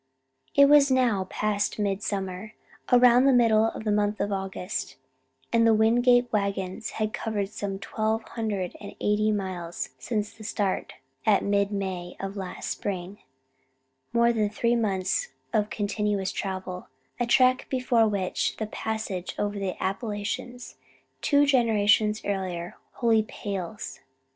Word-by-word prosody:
It 280 0 +8
was 290 -1 +6
now 245 -7 +2
past 205 +2 -1
midsummer, 200 0 -3 0.4
around 250 +1 +6
the 275 - +6
middle 225 -3 +5
of 225 - -3
the 215 - 0
month 210 0 +1
of 205 - -1
August, 195 0 -4 0.6
and 230 - +4
the 225 - +5
Wingate 245 +2 +4
wagons 200 0 -1
had 215 0 -1
covered 210 -5 -2
some 200 -2 -4
twelve 220 +2 -1
hundred 205 -6 -3
and 200 - -9
eighty 210 +1 +2
miles 185 -4 -3
since 210 -3 -2
the 220 - -13
start 205 -2 -2 0.3
at 210 -3 +3
mid 200 0 +1
May 185 -3 -4
of 195 0 -4
the 200 - -6
last 185 -1 -5
spring 190 0 -4 0.9
more 235 0 +3
than 215 -2 +1
three 235 +3 +1
months 200 - 0 0.3
of 210 -1 +1
continuous 205 -2 -1
travel; 185 -2 -5 0.3
a 240 - 0
trek 255 +1 +4
before 250 -3 +2
which 195 -3 -1
the 220 - -2
passage 215 -4 -4
over 205 0 -2
the 190 -2 -2
Appalachians, 210 +4 -4 0.4
two 285 0 +4
generations 220 -5 +3
earlier, 185 -3 -3 0.2
wholly 225 -2 +3
pales. 200 -2 -6
210 Hz, 140 wpm, -26 LUFS, 195-230 Hz, 0.9 s, It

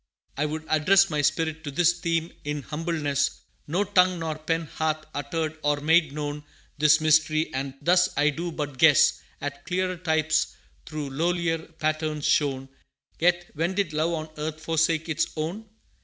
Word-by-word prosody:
I 150 +2 0
would 155 +1 -5
address 190 +5 +4
My 150 -1 +1
spirit 160 +2 0
to 145 - -5
this 175 +4 +2
theme 165 0 -1
in 150 -1 -3
humbleness 150 -3 -1 0.3
No 175 +7 +1
tongue 185 -2 +3
nor 165 -1 -2
pen 165 +1 -1
hath 155 0 -2
uttered 155 +2 -3
or 145 -1 +1
made 160 0 +3
known 145 0 -4 0.4
This 155 +1 +5
mystery, 155 0 +3
and 135 0 -3
thus 180 +3 +4
I 150 +1 +4
do 170 +4 -4
but 145 -4 -5
guess 150 -2 +5 0.2
At 145 0 -5
clearer 185 0 -1
types 160 -2 +1 0.3
through 150 -3 -5
lowlier 165 +2 0 0.2
patterns 155 -1 -1
shown; 135 -2 +1 0.5
Yet 175 +1 +2
when 165 +5 -1
did 195 -6 -1
Love 160 +3 0
on 155 -1 -4
earth 155 +1 -4
forsake 160 0 +1
its 160 -3 0
own? 180 +8 -4
155 Hz, 160 wpm, -26 LUFS, 150-170 Hz, 0.5 s, This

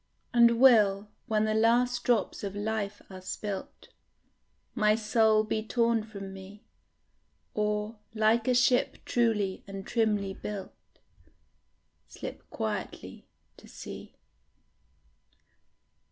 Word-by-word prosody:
And 235 -1 +5
will, 210 -6 +5 0.2
when 215 -1 +1
the 215 - 0
last 235 +3 +2
drops 230 -5 0
of 200 0 -4
life 205 -1 -3
are 185 0 -9
spilt, 195 +1 -6 0.8
My 215 -3 +3
soul 220 0 +3
be 215 0 -2
torn 230 0 +1
from 200 -3 -8
me, 195 +2 -12 0.9
Or, 210 +1 -2 0.2
like 220 +2 +2
a 250 - +3
ship 245 0 +3
truly 215 -5 0
and 195 -1 -7
trimly 210 -4 0
built, 200 -1 -6 1.3
Slip - - -9
quietly - - -5 0.3
to - - -15
sea? - - -10
215 Hz, 105 wpm, -29 LUFS, 205-230 Hz, 1.3 s, And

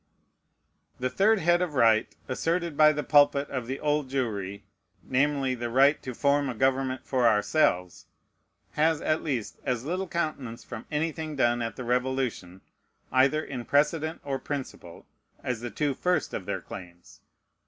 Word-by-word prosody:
The 130 0 -1
third 215 +3 +3
head 175 -1 +2
of 170 -5 -2
right 115 -3 +4 0.2
asserted 165 +4 -1
by 155 +1 +6
the 150 -1 -3
pulpit 145 -1 +4
of 130 -4 -3
the 135 +2 -4
Old 150 -2 0
Jewry, 105 -7 -3 0.4
namely, 135 0 +1
the 120 -1 -4
"right 135 +5 +4
to 130 -2 -6
form 140 +1 +2
a 125 - -4
government 130 0 0
for 125 -3 +2
ourselves," 105 - +1 0.6
has, 160 0 +2
at 155 0 0
least, 130 -9 -3
as 125 -2 -2
little 185 +4 -2
countenance 155 -9 -3
from 115 -2 -9
anything 155 0 -2
done 120 -2 +2
at 115 -1 -3
the 130 - -6
Revolution, 125 -7 -2 0.5
either 135 +4 +3
in 130 -3 -5
precedent 150 +5 +1
or 135 -1 -2
principle, 130 - -7 0.4
as 125 -3 -3
the 120 - -4
two 145 +6 -1
first 180 +2 0
of - - -5
their - - -2
claims. 90 -1 -12
135 Hz, 155 wpm, -27 LUFS, 120-150 Hz, 0.6 s, by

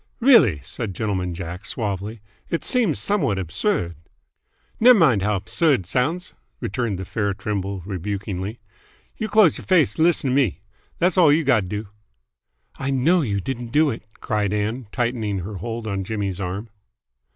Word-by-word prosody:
"Really," 225 - +6
said 95 - -5
Gentleman 95 -4 -2
Jack 85 +2 -6
suavely, 105 0 -4 0.3
"it 165 - -2
seems 235 - +2
somewhat 195 - 0
absurd 90 - -1 0.4
" - - -40
"Ney' 250 +3 +8
mind 155 - +4
how 105 +1 +1
'bsurd 135 - +1
't - - -22
sounds," 150 - -1 0.3
returned 105 -1 -2
the 95 - -5
fair 100 0 -1
Trimble 100 -2 -3
rebukingly. 100 +2 -4 0.6
"You 220 - -3
close 210 -5 +5
y'r - - -10
face 175 -5 +3
'n - - +4
lissen 165 -6 +3
t' - - +1
me. 120 -9 +1 0.4
Thass 185 +2 +2
all 165 -5 +7
you've 155 +1 +2
gotta 115 -8 +3
do." 105 +2 -5 0.9
"I 135 - -2
know 145 +7 +3
you 100 -8 -1
didn't 120 0 -5
do 150 +2 +3
it!" 115 - -6 0.2
cried 105 -2 -1
Ann, 110 +3 -2
tightening 115 -5 -1
her 100 +3 -6
hold 115 +2 -5
on 100 -3 -2
Jimmy's 100 -2 -3
arm. 100 +4 -4
110 Hz, 165 wpm, -22 LUFS, 100-145 Hz, 0.9 s, Ney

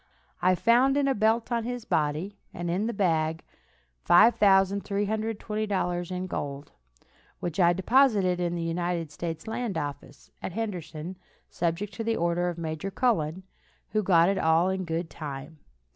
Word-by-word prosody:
I 185 0 +4
found 245 +7 +4
in 285 -1 +2
a 270 - +3
belt 225 +1 +1
on 235 -1 0
his 245 0 -5
body, 155 +7 -1 0.2
and 175 0 -3
in 195 +5 0
the - - 0
bag 165 -6 0 0.6
$5,320 200 -1 +2
in 180 0 -3
gold, 145 -5 -5 0.7
which 175 +1 -4
I 175 -1 +6
deposited 195 -2 +3
in 175 -1 -1
the 170 - -3
United 170 -1 -2
States 165 +1 -5
land 220 -4 -3
office, 145 -2 -7
at 185 - -5
Henderson, 180 -5 -5 0.3
subject 175 +4 -2
to 225 - -4
the 225 0 0
order 170 +1 +1
of 175 - -5
Major 160 +3 -4
Cullen, 190 -6 0 0.5
who 215 - +1
got 175 -4 +4
it 195 0 +1
all 160 +2 +3
in 190 -1 -2
good 165 +1 -2
time. 150 +1 -7
180 Hz, 150 wpm, -27 LUFS, 165-215 Hz, 0.7 s, I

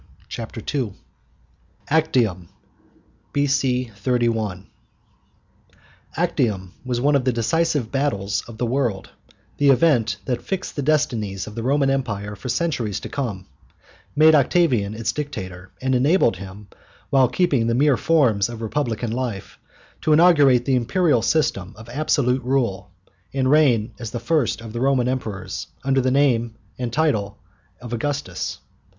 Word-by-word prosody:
CHAPTER 115 -1 -7
II 125 -8 -1 1.0
ACTIUM 120 - +1 0.8
B.C. 135 -4 +1
31 110 -4 -1 1.5
Actium 120 - -1
was 125 -2 -2
one 145 +3 +3
of 135 - +2
the 130 - +2
decisive 130 +1 0
battles 105 -8 -1
of 115 -2 -10
the 120 - -1
world 120 -5 -1 0.5
the 145 -1 +3
event 125 -7 +3
that 125 -2 -2
fixed 195 -1 -4
the 145 - -2
destinies 120 -10 0
of 105 - -9
the 115 - -5
Roman 135 +2 +2
Empire 105 -6 -2
for 105 +6 -7
centuries 125 - -1
to - - -7
come, 110 -10 -4 0.7
made 155 +1 +6
Octavian 135 - +2
its 115 0 -1
dictator, 95 -11 -6
and 130 0 +1
enabled 130 - +3
him, 100 +2 -10 0.4
while 135 -2 +5
keeping 135 -3 +1
the 115 - +1
mere 140 +1 +4
forms 125 -10 +2
of 115 -1 -7
Republican 115 -1 -2
life, 115 -5 -4 0.4
to 155 - +3
inaugurate 145 -7 +5
the 135 - +1
imperial 145 +1 +2
system 110 - 0
of 110 +1 -12
absolute 130 -2 +1
rule, 120 -8 -1 0.5
and 130 -1 +2
reign 130 -8 +3
as 115 -3 -5
the 120 - -4
first 130 -1 0
of 115 -1 -9
the 120 - -3
Roman 130 -2 +2
Emperors, 110 -7 -4 0.2
under 135 0 +2
the 130 - +1
name 125 -4 +2 0.2
and 125 -2 -3
title 110 -10 0 0.4
of 120 -1 -8
Augustus. 130 -6 -3
125 Hz, 140 wpm, -22 LUFS, 110-140 Hz, 1.5 s, made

